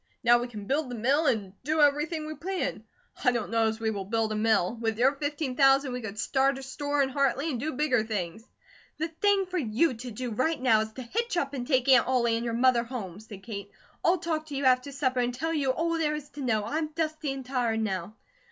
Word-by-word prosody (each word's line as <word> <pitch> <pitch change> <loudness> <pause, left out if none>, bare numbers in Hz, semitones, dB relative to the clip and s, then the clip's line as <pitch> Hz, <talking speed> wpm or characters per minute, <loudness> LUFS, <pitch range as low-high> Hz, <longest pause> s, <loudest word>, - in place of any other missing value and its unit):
Now 240 0 +6
we 240 - -3
can 210 -4 -8
build 275 +4 0
the 245 - -5
mill, 275 +8 +2
and 200 -6 0
do 310 +3 0
everything 300 +2 +2
we 310 - -5
planned. 370 +4 -3 0.4
I 250 - +5
don't 235 -3 -3
know 225 -1 +3
as 220 0 -2
we 220 -1 0
will 200 -2 -4
build 225 +1 0
a - - -1
mill. 215 -2 +2
With 225 -1 -1
your 255 +3 +4
fifteen 290 -2 -3
thousand 270 -1 +4
we 250 - -4
could 215 -2 -6
start 270 +5 +1
a 270 - -8
store 285 +2 -1
in 265 - -1
Hartley, 275 +3 +1
and 245 - -3
do 310 +5 -2
bigger 255 -5 +2
things." 210 -2 -4 0.5
"The 320 +2 -2
thing 395 +4 +2
for 365 0 -2
you 255 +4 +1
to 245 +2 -7
do 240 +2 -5
right 275 +9 0
now 230 -4 +4
is 220 0 -4
to 260 - -7
hitch 455 - -2
up 280 -4 -1
and 250 -3 -4
take 260 -3 +2
Aunt 260 -3 +6
Ollie 240 -3 +2
and 230 - -2
your 230 -1 -2
mother 245 -1 +4
home," 215 -7 -6
said 210 -3 -11
Kate. 200 -3 -6 0.3
"I'll 355 +2 +4
talk 315 -2 -3
to 290 - -6
you 275 0 -1
after 255 +2 +3
supper 260 -2 0
and 245 0 0
tell 325 +5 -2
you 285 -4 0
all 330 +6 0
there 300 -1 +1
is 295 -1 -7
to 290 - -9
know. 220 -5 0
I'm 310 +7 -1
dusty 310 -3 -2
and 270 -1 -6
tired 245 -4 0
now." 195 -1 -3
255 Hz, 245 wpm, -28 LUFS, 225-295 Hz, 0.5 s, Now